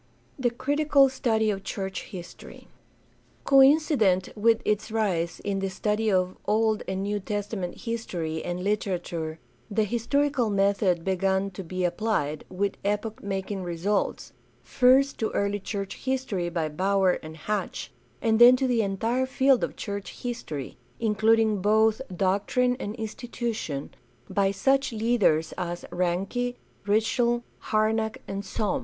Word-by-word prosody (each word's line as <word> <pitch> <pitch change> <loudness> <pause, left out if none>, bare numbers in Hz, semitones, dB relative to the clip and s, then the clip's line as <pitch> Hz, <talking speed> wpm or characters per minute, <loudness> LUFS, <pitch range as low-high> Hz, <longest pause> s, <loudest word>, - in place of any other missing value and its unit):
The 250 -2 +2
critical 280 +2 +3
study 220 -5 +1
of 195 -1 -5
church 190 -1 -4
history. 180 -4 -10 0.4
— - - -35
Coincident 270 - +4
with 225 +1 +3
its 210 +1 0
rise 190 -7 -1
in 200 -1 -2
the 195 0 -1
study 210 +3 0
of 185 -1 +1
Old 220 0 +2
and 190 0 -2
New 205 +1 -1
Testament 205 -2 -4
history 175 -9 -3
and 175 +1 -3
literature 175 -6 -2 0.3
the 215 +1 +1
historical 245 +3 +1
method 195 -3 +2
began 190 +1 +1
to 190 +1 -7
be 185 +2 -3
applied, 175 -5 -1
with 200 +2 -2
epoch 210 +2 -2
making 195 0 -3
results, 180 +4 -2 0.3
first 270 +1 +4
to 220 - 0
early 200 0 0
church 195 0 -5
history 255 -10 -2
by 170 -2 -1
Baur 185 +4 +1
and 155 0 -9
Hatch, 210 +6 -3 0.3
and 220 -1 +3
then 245 +1 +9
to 265 +1 0
the 245 -3 +2
entire 225 +6 0
field 265 -1 +3
of - - -2
church 200 -2 -6
history, 155 - -5 0.2
including 220 -1 +3
both 220 +3 +3
doctrine 200 +7 +1
and 205 -2 -4
institution, 225 - -4 0.4
by 195 -1 +1
such 265 +7 +1
leaders 215 -9 +2
as 175 -1 -4
Ranke, 195 +8 -1 0.3
Ritschl, 235 +3 +2 0.2
Harnack, 220 +1 0
and 195 0 -4
Sohm. 200 0 -1
210 Hz, 135 wpm, -26 LUFS, 190-230 Hz, 0.4 s, then